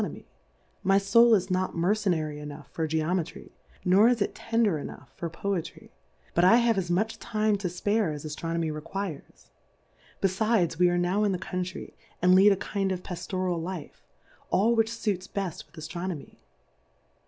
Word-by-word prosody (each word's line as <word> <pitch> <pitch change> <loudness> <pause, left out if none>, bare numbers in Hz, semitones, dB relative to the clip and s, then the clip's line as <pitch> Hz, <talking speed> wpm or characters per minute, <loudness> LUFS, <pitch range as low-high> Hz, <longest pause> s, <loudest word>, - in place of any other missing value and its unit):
nomy, - - -5 0.6
my 195 0 +4
Soul 225 +4 +6
is 190 -1 -1
not 185 -1 -1
mercenary 170 -5 0
enough 150 0 -9
for 160 -1 -2
Geometry, 160 +1 -2 0.3
nor 195 +5 +6
is 245 -2 +2
it 200 - 0
tender 225 -8 +1
enopugh - - -9
for 170 - -4
Poetry; 180 +1 -4 0.4
but 170 - +3
I 185 +5 +7
have 235 -1 +3
as 185 -3 -2
much 215 +6 0
Time 215 -2 +1
to 195 - -2
fpare 205 +2 0
as 150 0 -6
Aftronomy 165 +1 -2
requires 155 - -7
i 130 - -11
befides 190 -3 +1
we 180 0 +5
are 175 - +1
now 180 +4 +1
in 205 -2 +2
the - - -1
Country, 185 0 -5 0.3
and 180 +1 +5
lead 195 +2 +7
a - - +4
kind 195 0 -2
of 185 -1 -3
Paftoral 180 -1 -3
Life, 175 -3 -7 0.5
all 225 +5 +3
which 225 -1 +2
fuits 210 -5 -2
beft 195 -5 -4
with - - -23
Aftronomy. 170 0 -6
185 Hz, 165 wpm, -27 LUFS, 170-205 Hz, 0.6 s, I